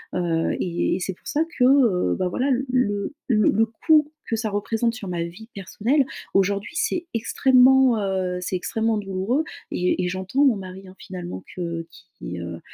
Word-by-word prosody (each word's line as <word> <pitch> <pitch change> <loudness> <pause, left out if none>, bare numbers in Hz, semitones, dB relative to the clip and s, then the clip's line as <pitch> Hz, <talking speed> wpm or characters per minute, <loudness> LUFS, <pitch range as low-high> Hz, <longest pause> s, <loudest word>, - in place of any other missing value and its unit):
Heu, 170 -2 0
et 170 -1 0
et - - -3
c'est 190 - -2
pour - - -16
ça 300 - 0 0.2
que, 250 - +5
heu, 250 -9 +4
bah, 185 -1 0
voilà, 255 +9 -1 0.2
le 205 -5 0
le 215 -4 +3
le 220 +3 +3
coût 300 +6 +3 0.2
que 225 - +1
ça 220 -1 -2
représente 225 +3 -1
sur 215 -5 -7
ma 175 -1 -2
vie 180 +7 -9
personnelle, 220 - 0 0.3
aujourd'hui, 200 - +1
c'est 345 +1 -1
extrêmement, 255 +1 +4
heu 185 -2 -1
c'est 185 - -2
extrêmement 220 +4 0
douloureux. 200 +8 -1 0.3
Et 180 0 0
et - - 0
j'entends 190 +10 0
mon 260 -5 +4
mari, 190 0 -9
hein 185 - -13
finalement, 175 - -7
que 170 -2 -4 0.3
qui, 90 0 -6
heu, 85 -1 -6
200 Hz, 180 wpm, -23 LUFS, 180-245 Hz, 0.3 s, que